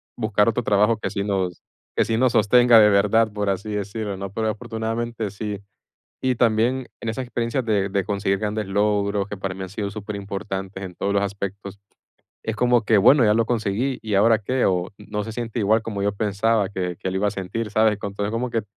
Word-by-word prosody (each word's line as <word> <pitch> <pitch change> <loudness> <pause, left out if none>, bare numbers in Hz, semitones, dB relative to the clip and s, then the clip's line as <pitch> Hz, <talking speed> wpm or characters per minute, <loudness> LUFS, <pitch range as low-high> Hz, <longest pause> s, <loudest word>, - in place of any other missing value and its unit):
buscar 105 0 +1
otro 115 +2 +1
trabajo 105 +2 +3
que 100 - -3
sí 100 0 -2
nos 95 -4 -2 0.3
que - - +3
sí 115 - 0
nos 125 -1 +3
sostenga 120 +2 +6
de 105 -1 +7
verdad, 105 +2 +3
por 105 -1 -1
así 100 +3 -2
decirlo, 105 0 -3
¿no? 100 0 -5
Pero 110 +1 -1
afortunadamente 115 -1 -3
sí. 105 -1 -5 0.6
Y 130 -1 0
también 120 +3 +2
en 115 - -5
esas 125 +4 -2
experiencias 120 +1 -2
de 105 -3 +1
de 100 -1 -1
conseguir 100 -1 0
grandes 105 0 -2
logros, 100 0 +1
que 105 - -5
para 95 0 -4
mí 95 - -7
han 95 - -5
sido 100 +1 -4
superimportantes 100 -2 -5
en 90 -2 -8
todos 100 - -2
los 100 0 +2
aspectos, 100 0 -5 0.6
es 110 - -3
como 120 0 +3
que, 110 0 +3
bueno, 120 +5 +6
ya 105 - +4
lo 115 +1 +2
conseguí, 120 +3 -1
¿y 110 -2 -4
ahora 110 +3 +5
qué? 125 +4 -1
O, 90 -1 0
n 105 - -15
no 105 0 -2
se 110 - -6
siente 120 -1 -4
igual 110 +1 +3
como 105 -3 -4
yo 100 0 +1
pensaba 105 0 +1
que 90 -3 -3
que 95 - -3
lo 95 - -1
iba 105 +2 +1
a 100 - 0
sentir, 105 +3 -4
¿sabes? 110 0 +3
Co 100 - -5
entonces, 100 +1 -3
como 120 +2 -2
que 115 -3 -1
105 Hz, 220 wpm, -23 LUFS, 100-115 Hz, 0.6 s, de